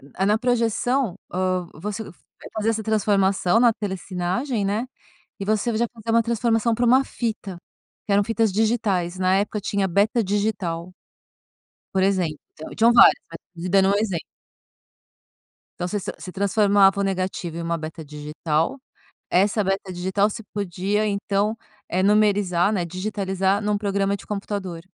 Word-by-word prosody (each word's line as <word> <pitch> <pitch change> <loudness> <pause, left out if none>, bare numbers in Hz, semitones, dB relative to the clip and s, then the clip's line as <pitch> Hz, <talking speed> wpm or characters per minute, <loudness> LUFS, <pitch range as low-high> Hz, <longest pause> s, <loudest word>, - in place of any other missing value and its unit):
a 190 - 0
na 210 +2 +3
projeção, 245 -1 0 0.2
ah, 185 0 0
você 210 +6 -5
vai - - -11 0.4
fazer 215 0 0
essa 220 -1 -1
transformação 200 -2 +2
na 240 -1 +6
telessinagem, 195 +4 -2
né, 210 +5 -1 0.5
e 195 - -4
você 215 +2 0
já 235 - +2
fazer 230 -1 -5
uma 230 - +4
transformação 230 0 +1
para 240 +2 +1
uma 260 +3 +5
fita 215 -6 -4 0.5
que 200 - +1
eram 200 +1 +4
fitas 225 0 +1
digitais. 205 -5 0
Na 185 0 +3
época 205 +1 -1
tinha 200 0 0
beta 205 +6 +2
digital 195 -4 -2 1.0
por 190 - +2
exemplo, 185 -5 +1 0.2
então, 155 - -9
tinham 230 +2 +5
várias, 235 - +8 0.2
mas 165 - -8 0.2
tô 170 - -11
te 180 - -3
dando 190 +1 +4
um - - +3
exemplo. 200 -6 -1 1.5
Então 175 - -3
você 205 - -2
se 195 - -5
você 185 - -8
transformava 200 0 +3
o - - +2
negativo 185 -3 -3
em 170 - -4
uma 170 0 -1
beta 160 0 -7
digital, 150 - -2 0.5
essa 200 +3 +2
beta 195 0 -2
digital 190 +3 +1
você 225 - -7
podia, 200 +1 -1
então 205 +1 0 0.3
eh 185 - 0
numerizar, 200 -2 +3
né, 180 -4 0
digitalizar 190 +2 -1
num 210 0 0
programa 200 -1 0
de - - -14
computador. 195 -4 -4
200 Hz, 160 wpm, -23 LUFS, 185-215 Hz, 1.5 s, várias